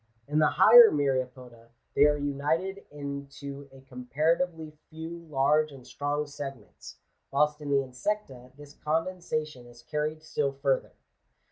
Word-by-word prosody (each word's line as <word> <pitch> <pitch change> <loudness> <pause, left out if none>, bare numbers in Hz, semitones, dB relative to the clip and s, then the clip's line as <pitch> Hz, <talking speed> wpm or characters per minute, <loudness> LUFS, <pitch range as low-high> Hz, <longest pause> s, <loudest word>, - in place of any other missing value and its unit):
In 150 +2 +1
the 155 - +5
higher 235 0 +8
Myriapoda 130 -4 -2 0.2
they 145 - +5
are 150 0 +2
united 150 +7 -2
into 140 -1 -7
a 135 0 -15
com 125 -1 -11
paratively 160 +1 0 0.2
few 165 +1 -8
large 150 +2 +2
and 135 -3 -13
strong 145 +1 -2
segments, 140 -7 -9 0.3
whilst 150 +2 +1
in 145 - -6
the 140 -1 +3
Insecta 130 -1 -4
this 145 -1 -13
condensation 155 -5 -3
is 120 0 -16
carried 150 +4 -3
still 145 -3 -1
further. 135 -1 -1
145 Hz, 135 wpm, -28 LUFS, 135-155 Hz, 0.3 s, higher